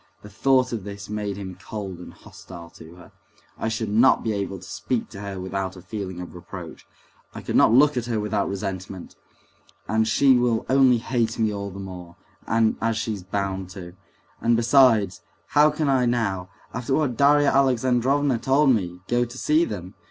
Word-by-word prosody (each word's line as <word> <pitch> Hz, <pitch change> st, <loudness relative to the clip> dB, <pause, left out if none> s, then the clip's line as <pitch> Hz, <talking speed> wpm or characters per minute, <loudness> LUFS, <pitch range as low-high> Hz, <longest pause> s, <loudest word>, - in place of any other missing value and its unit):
The 105 Hz, -, -12 dB
thought 130 Hz, +4 st, +2 dB
of 110 Hz, -4 st, -4 dB
this 100 Hz, 0 st, -8 dB
made 105 Hz, -2 st, -3 dB
him 95 Hz, -3 st, -8 dB
cold 95 Hz, -5 st, -6 dB
and 90 Hz, -, -10 dB
hostile 85 Hz, -2 st, -13 dB
to 80 Hz, +1 st, -14 dB
her. 90 Hz, -, -15 dB, 0.4 s
"I -, -, -3 dB
should 110 Hz, -1 st, -2 dB
not 115 Hz, +5 st, +4 dB
be 110 Hz, -, -1 dB
able 100 Hz, -1 st, -3 dB
to 90 Hz, -, -14 dB
speak 110 Hz, +3 st, -3 dB
to 100 Hz, -2 st, -9 dB
her 100 Hz, -2 st, -6 dB
without 95 Hz, 0 st, -4 dB
a 90 Hz, -, -11 dB
feeling 95 Hz, -3 st, -6 dB
of 90 Hz, -, -8 dB
reproach; 90 Hz, -1 st, -10 dB, 0.5 s
I -, -, -6 dB
could -, -, -3 dB
not -, -, +5 dB
look 145 Hz, +4 st, +5 dB
at 120 Hz, -1 st, -2 dB
her 115 Hz, -3 st, -1 dB
without 105 Hz, -1 st, -1 dB
resentment; 95 Hz, -2 st, -6 dB, 0.7 s
and 110 Hz, 0 st, +1 dB
she 130 Hz, +3 st, +4 dB
will 120 Hz, -2 st, +1 dB
only 130 Hz, -2 st, +5 dB
hate 115 Hz, -1 st, -1 dB
me 110 Hz, -2 st, +1 dB
all 100 Hz, 0 st, -4 dB
the 95 Hz, -, -10 dB
more, 90 Hz, -3 st, -9 dB, 0.3 s
as 115 Hz, 0 st, +1 dB
she's 110 Hz, -3 st, -3 dB
bound 95 Hz, 0 st, -3 dB
to. 90 Hz, -2 st, -9 dB, 0.5 s
And 115 Hz, 0 st, +3 dB
besides, 115 Hz, -5 st, +4 dB, 0.3 s
how 150 Hz, +1 st, +5 dB
can 150 Hz, 0 st, -2 dB
I 130 Hz, -3 st, +2 dB
now, 100 Hz, -7 st, -1 dB, 0.2 s
after 125 Hz, +2 st, -1 dB
what 145 Hz, -6 st, 0 dB
Darya 145 Hz, +2 st, +4 dB
Alexandrovna 130 Hz, 0 st, +2 dB
told 135 Hz, +2 st, +3 dB
me, 90 Hz, -6 st, -1 dB
go 120 Hz, 0 st, +2 dB
to 120 Hz, +1 st, -7 dB
see 155 Hz, +5 st, +2 dB
them? 90 Hz, -, -7 dB
110 Hz, 185 wpm, -24 LUFS, 95-125 Hz, 0.7 s, not